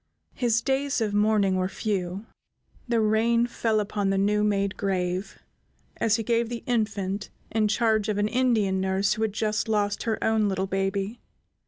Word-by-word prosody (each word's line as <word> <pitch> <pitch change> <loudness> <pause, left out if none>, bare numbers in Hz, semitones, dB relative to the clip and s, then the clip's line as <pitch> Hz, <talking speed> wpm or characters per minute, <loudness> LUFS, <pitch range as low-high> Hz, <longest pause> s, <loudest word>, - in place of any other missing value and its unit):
His 235 -2 +1
days 270 0 0
of 215 -3 -1
mourning 205 -2 +2
were 185 0 0
few. 195 -1 -3 0.6
The 235 -1 +1
rain 225 +2 +3
fell 225 -2 0
upon 205 -1 -1
the 195 - +1
new 210 +2 +2
made 200 -1 0
grave 185 -1 -2 0.6
as 225 -2 +2
he 225 - -2
gave 230 0 +1
the 235 -1 -5
infant 210 -4 -1 0.2
in 215 -1 +2
charge 220 -1 +1
of 210 - 0
an 205 0 +2
Indian 220 -6 +1
nurse 190 +1 +1
who 220 - -5
had 220 -2 0
just 215 +1 -1
lost 205 -1 0
her 220 - 0
own 220 -2 +2
little 190 0 -1
baby. 195 +3 -2
210 Hz, 170 wpm, -26 LUFS, 195-225 Hz, 0.6 s, rain